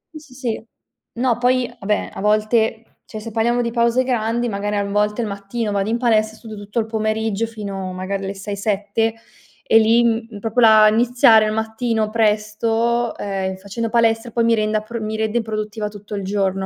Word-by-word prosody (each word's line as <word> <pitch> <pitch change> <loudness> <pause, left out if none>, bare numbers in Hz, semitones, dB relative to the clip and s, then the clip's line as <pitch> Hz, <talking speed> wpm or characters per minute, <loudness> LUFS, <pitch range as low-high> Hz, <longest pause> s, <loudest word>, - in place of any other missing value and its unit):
Sì, - - -6
sì, 295 -4 -17
sì. 230 -3 -4 0.5
No, 240 -1 0
poi, 250 0 +2
vabbè, 210 +1 -1
a - - -7
volte 220 +2 +1
cioè 215 - -8
se 225 +1 -8
parliamo 235 +2 +1
di 235 - -2
pause 235 +2 +2
grandi, 240 -1 0
magari 205 0 -2
a 200 - +1
n 200 - -5
volte 210 +2 +1
il 225 - -2
mattino 205 +2 -4
vado 200 +1 -1
in 230 - +1
palestra 220 -3 +1
e - - -17
studio 220 -1 -10
tutto 205 +2 -8
il 220 - 0
pomeriggio 220 0 -1
fino 200 -4 -6
magari 195 +1 -4
alle 195 +1 -4
6-7 205 +2 -1 0.5
e 225 - +5
lì, 230 +2 +4
mhmm, 225 -2 -1
proprio 225 +3 0
la 215 -1 +7
iniziare 230 -1 +5
al 215 - 0
mattino 220 0 -1
presto, 225 +2 +1
ehm, 190 -1 -3
facendo 200 +4 -4
palestra 225 0 +2
poi 235 +1 +1
mi 230 - +4
renda 215 0 0
pr 235 +2 -6
mi 215 0 -3
rende 220 +2 0
produttiva 215 -1 -4
tutto 205 0 -11
il 200 -1 -3
giorno. 195 -1 -1
220 Hz, 195 wpm, -20 LUFS, 210-230 Hz, 0.5 s, la